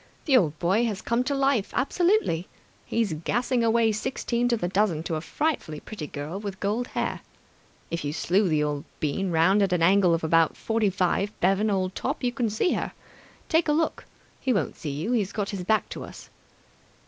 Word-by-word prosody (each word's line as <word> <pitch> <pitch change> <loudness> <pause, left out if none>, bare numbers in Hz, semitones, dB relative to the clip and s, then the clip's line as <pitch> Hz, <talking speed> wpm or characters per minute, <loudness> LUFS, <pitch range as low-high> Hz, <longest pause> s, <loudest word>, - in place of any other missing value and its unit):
The 280 - +4
old 160 - +3
boy 190 +9 +2
has 210 -4 -2
come 235 +3 0
to 280 - 0
life 270 -6 +1
absolutely! 340 - +1 0.4
He's 225 -7 0
gassing 240 +10 0
away 225 0 +3
sixteen 235 +2 -1
to 240 -1 +2
the 175 - -2
dozen 185 -4 +1
to 165 - -3
a 155 - -1
frightfully 265 - -2
pretty 165 -5 -7
girl 150 +7 -5
with 200 -2 -6
gold 215 +5 -1
hair. - - -3 0.7
If 170 - -2
you 145 - -2
slew 185 +5 +1
the 155 -2 +2
old 145 -1 -2 0.2
bean 155 +6 -1
round 175 +5 +4
at 195 -2 +2
an 170 -2 +2
angle 185 -1 +5
of 165 - -4
about 165 0 +3
forty 225 -2 +1
five, 190 +2 0
Bevan, 195 +4 +2
old 190 -2 0
top, - - -3
you 245 - +1
can 240 -1 -1
see 215 - +1
her. - - -3 0.5
Take 325 0 +2
a 300 - +3
look. 320 +1 0 0.3
He 260 - 0
won't 205 - 0
see 155 - -6
you. 155 - -3
He's 210 -6 +1
got 205 -3 -3
his 195 -3 -4
back 220 +4 +1
to - - -6
us." - - -12
200 Hz, 200 wpm, -26 LUFS, 170-235 Hz, 0.7 s, angle